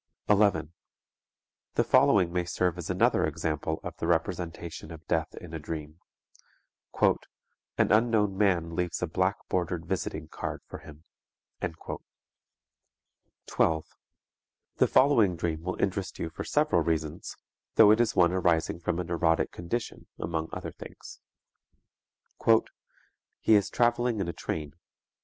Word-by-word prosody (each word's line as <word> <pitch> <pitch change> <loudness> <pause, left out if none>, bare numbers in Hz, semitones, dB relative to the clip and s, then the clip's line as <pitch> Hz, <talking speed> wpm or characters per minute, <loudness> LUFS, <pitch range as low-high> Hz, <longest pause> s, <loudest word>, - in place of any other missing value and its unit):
11. 100 -6 +3 1.0
The - - +3
following 90 -4 +4
may 90 -1 +1
serve 90 0 -1
as 85 - -6
another - - +3
example 80 0 -2
of - - -6
the 80 - -3
representation 85 -1 -2
of 80 -1 -10
death 80 -1 -1
in 85 -2 -10
a 80 - -3
dream: 75 +1 -6 1.0
"An - - +2 0.6
unknown 105 -3 +3
man 90 -5 +1
leaves 90 0 -2
a - - +1
black 95 +4 +1
bordered 85 -2 -1
visiting 80 -3 -3
card - - -5
for - - -9
him." 75 0 -14 2.4
12. 80 -1 +1 0.9
The - - +4
following 115 -10 +4
dream 80 -1 -2
will 90 +2 -4
interest 95 -1 -1
you 80 - -4
for - - -6
several - - +2
reasons, 80 -2 -2 0.4
though 105 -2 +8
it 110 +2 +5
is 115 -1 +1
one 85 -1 +5
arising 85 -3 +1
from 85 0 -1
a 90 - -1
neurotic 85 -1 +1
condition 105 +7 -5
among 80 -1 -3
other - - -5
things: - - -11 1.2
"_He 115 0 +5 0.8
is 105 -3 +5
traveling 120 -1 +1
in 95 - -1
a 85 - -3
train. 75 -2 -4
85 Hz, 130 wpm, -28 LUFS, 80-100 Hz, 2.4 s, though